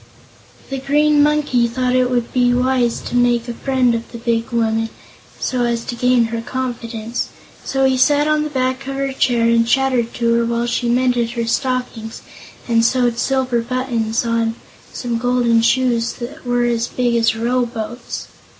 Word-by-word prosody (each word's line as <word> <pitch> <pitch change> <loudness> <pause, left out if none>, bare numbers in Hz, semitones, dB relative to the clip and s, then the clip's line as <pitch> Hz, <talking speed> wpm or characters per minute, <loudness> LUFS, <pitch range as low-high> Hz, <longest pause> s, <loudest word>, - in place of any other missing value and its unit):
The 270 - -2
Green 295 +2 +3
Monkey 290 -5 +2
thought 250 +1 -1
it 255 -1 +3
would 240 -2 -1
be 245 -1 +3
wise 250 -1 +1
to - - -5
make 240 -1 +2
a 240 - -3
friend 255 -1 +1
of 230 0 -4
the 235 - -7
big 230 -1 -1
woman, 225 -2 0 0.5
so 250 -2 -1
as 235 -1 -1
to 240 - -4
gain 250 0 +3
her 230 - -2
confidence, 235 -2 -4 0.3
so 270 0 0
he 265 -1 +2
sat 290 +3 +3
on 305 0 +2
the 305 - -2
back 260 -1 -2
of 275 - -3
her 275 0 -2
chair 245 -3 +1
and 230 0 +3
chattered 255 -2 +1
to 235 -1 +1
her - - +1
while 235 0 -1
she 240 0 -1
mended 245 -1 +1
her 235 -1 -2
stockings 235 -2 -2 0.4
and 230 -1 +3
sewed 240 -1 +2
silver 260 -3 +1
buttons 235 -2 -1
on 230 -1 0 0.4
some 240 -2 -3
golden 245 -1 +2
shoes 235 -1 +1
that 260 +3 -9
were 245 0 +1
as 235 -1 0
big 245 -1 0
as 225 -1 +2
row 240 +2 0
boats. 230 +1 -6
245 Hz, 175 wpm, -19 LUFS, 230-255 Hz, 0.5 s, Green